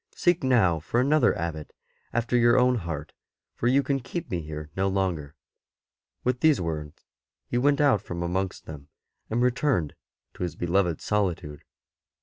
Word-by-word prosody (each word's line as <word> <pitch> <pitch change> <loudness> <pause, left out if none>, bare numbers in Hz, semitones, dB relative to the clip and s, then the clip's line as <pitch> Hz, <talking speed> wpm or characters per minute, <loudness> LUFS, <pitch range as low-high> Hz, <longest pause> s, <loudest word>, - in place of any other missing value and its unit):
Seek 175 -3 +2
now 105 -11 +3
for 85 +9 -1
another 140 +1 +3
Abbot 80 -2 -5 0.4
after 120 +1 0
your 120 0 +5
own 125 0 +4
heart, 80 -6 -5 0.4
for 120 - -2
you 135 +3 +4
can 135 0 0
keep 170 +6 -6
me 90 -2 -1
here 75 -1 -7
no 95 +1 +1
longer." 90 -7 -1 0.9
With 125 0 0
these 155 0 +4
words 80 -3 -5 0.4
he 120 - -1
went 140 +2 +3
out 140 -9 +4
from 85 -3 -5
amongst 95 +2 -2
them, 70 -3 -9 0.4
and 120 +3 +1
returned 125 - +1 0.4
to - - -13
his 85 -3 -2
beloved 85 -1 0
solitude. 90 -8 -2
95 Hz, 155 wpm, -26 LUFS, 80-125 Hz, 0.9 s, your